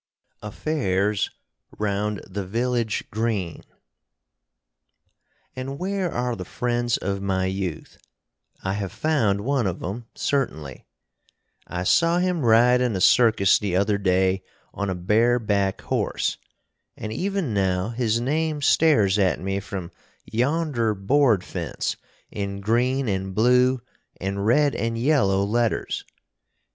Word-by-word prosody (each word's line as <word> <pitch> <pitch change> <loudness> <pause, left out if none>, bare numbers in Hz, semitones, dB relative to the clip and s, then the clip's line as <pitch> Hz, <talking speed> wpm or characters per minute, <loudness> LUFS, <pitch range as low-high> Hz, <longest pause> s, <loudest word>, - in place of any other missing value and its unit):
AFFAIRS 105 -4 -1 0.5
ROUND 105 0 -1
THE 100 +1 -4
VILLAGE 115 +2 -1
GREEN 105 -6 -2 1.9
And 135 +2 -5
where 190 0 -2
are 125 0 -1
the 90 - -6
friends 120 +4 -1
of 100 +1 -3
my 95 -1 0
youth? 95 -3 -4 0.6
I 95 - -1
have 100 -2 -3
found 115 -11 +1
one 130 -1 0
of 90 -1 -4
'em, 110 +6 -5
certainly. 80 - -2 0.8
I 90 0 -3
saw 165 - +3
him 180 -2 0
ride 120 +2 +5
in 125 -4 +1
a - - -1
circus 110 -1 +5
the 100 -4 -2
other 100 +2 +2
day 95 0 +2 0.3
on 100 -1 -3
a 95 - -1
bareback 105 +1 +1
horse, - - -1 0.6
and 110 0 -5
even 190 - -2
now 95 0 0
his 115 -1 0
name 150 +4 -1
stares 105 -14 +4
at 95 -3 +2
me 95 +1 -2
from 100 -3 -6 0.3
yonder 125 -3 0
board 110 0 +3
fence 85 -7 -3 0.4
in 100 -1 -4
green 125 +6 +1
and 95 -2 -2
blue 125 +3 +3 0.4
and 100 +2 -2
red 145 +4 +4
and 115 +2 -2
yellow 115 -7 +2
letters. 115 +2 -1
110 Hz, 125 wpm, -24 LUFS, 95-125 Hz, 1.9 s, ride